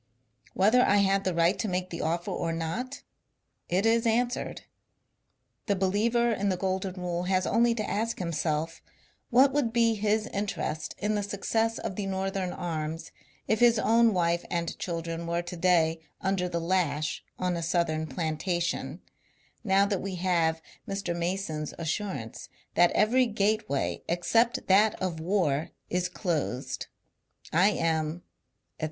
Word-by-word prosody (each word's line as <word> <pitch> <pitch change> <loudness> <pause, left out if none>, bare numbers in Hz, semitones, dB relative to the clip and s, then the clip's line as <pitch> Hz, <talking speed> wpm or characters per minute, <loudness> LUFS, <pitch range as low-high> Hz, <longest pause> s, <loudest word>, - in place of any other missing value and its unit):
Whether 215 +6 +5
I 205 - +4
had 195 0 +2
the 185 -2 0
right 170 +3 +3
to 220 - -1
make 185 -1 -2
the 170 - -4
offer 170 +2 -1
or 165 - -2
not, 170 +12 -4 0.7
it 185 +4 +1
is 230 +1 +3
answered. 240 +2 0 1.0
The 200 - +2
believer 220 +5 +2
in 200 -2 0
the 185 - 0
golden 190 0 -2
rule 175 0 -2
has 185 0 +1
only 235 0 +3
to 215 -2 -2
ask 225 +3 -1
himself 165 -2 -2 0.5
what 265 +3 +5
would 280 -6 +1
be 230 -1 +3
his 215 0 +1
interest 195 -6 -3
in 210 +1 -1
the 210 - 0
success 225 +3 -1
of 185 - -5
the 200 -2 -2
Northern 190 -1 -2
arms 160 -2 -4 0.4
if 220 - +2
his 240 -1 +5
own 230 +1 +4
wife 170 -2 +1
and 170 -1 -2
children 165 -1 -4
were 170 +1 -1
to 175 +1 -7
day 165 -2 +3 0.2
under 190 -1 0
the 170 - -1
lash 165 -4 0
on 180 -1 -1
a 170 - -3
Southern 160 -2 0
plan 160 -2 -2
tation, 175 0 -2 0.6
now 195 -2 +4
that 200 -2 -1
we 195 -1 -4
have 170 -3 +1 0.2
Mr. 195 -3 -2
Mason's 170 -3 -3
assurance 165 - -4 0.2
that 175 0 +5
every 250 +4 +3
gateway 205 -9 0
except 225 +8 +2
that 205 +3 +4
of 180 -3 -2
war 160 -4 0 0.2
is 180 0 0
closed. 160 - -2 0.7
I 180 +5 +5
am, 165 -3 -1 0.5
etc. - - -48
185 Hz, 150 wpm, -28 LUFS, 170-210 Hz, 1.0 s, Whether